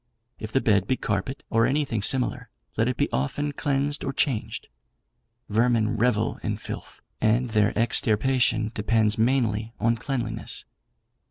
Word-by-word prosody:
If 110 -1 -6
the 135 - +2
bed 100 -3 +2
be 130 - +1
carpet, 105 +7 -3
or 115 0 +3
anything 135 -6 0
similar, 125 +4 +1 0.3
let - - +1
it - - -1
be - - +2
often 145 - -1
cleansed 145 0 -1
or 135 - -1
changed. 135 -5 -1 0.8
Vermin 115 +1 +2
revel 115 -1 +1
in - - -2
filth, - - -8 0.2
and 115 +2 +2
their 105 -1 +3
extirpation 115 0 +2
depends 110 0 +1
mainly 115 -2 +1
on 115 +1 +2
cleanliness. 125 0 -3
115 Hz, 140 wpm, -25 LUFS, 110-130 Hz, 0.8 s, or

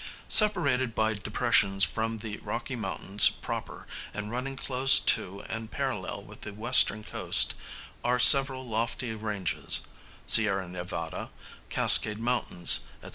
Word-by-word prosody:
Separated 140 - +2
by 110 0 -2
depressions 105 -2 -2
from 115 0 -3
the 110 -1 -9
Rocky 120 +3 -8
Mountains 100 -2 +3
proper, - - -9 0.3
and 105 +1 -8
running 130 +3 -6
close 135 0 +4
to 100 +2 -2
and 115 0 -8
parallel 130 -9 -6
with - - -17
the 105 - -10
western 110 -1 +2
coast, - - 0 0.5
are 125 +1 -1
several 130 0 +5
lofty 115 +1 -5
ranges 105 -4 -2 0.4
(Sierra 100 -4 +3
Nevada, 90 0 -8 0.4
Cascade 105 -1 +5
Mountains, 115 -7 +2 0.2
&c.). - - -12
110 Hz, 125 wpm, -25 LUFS, 105-125 Hz, 0.5 s, several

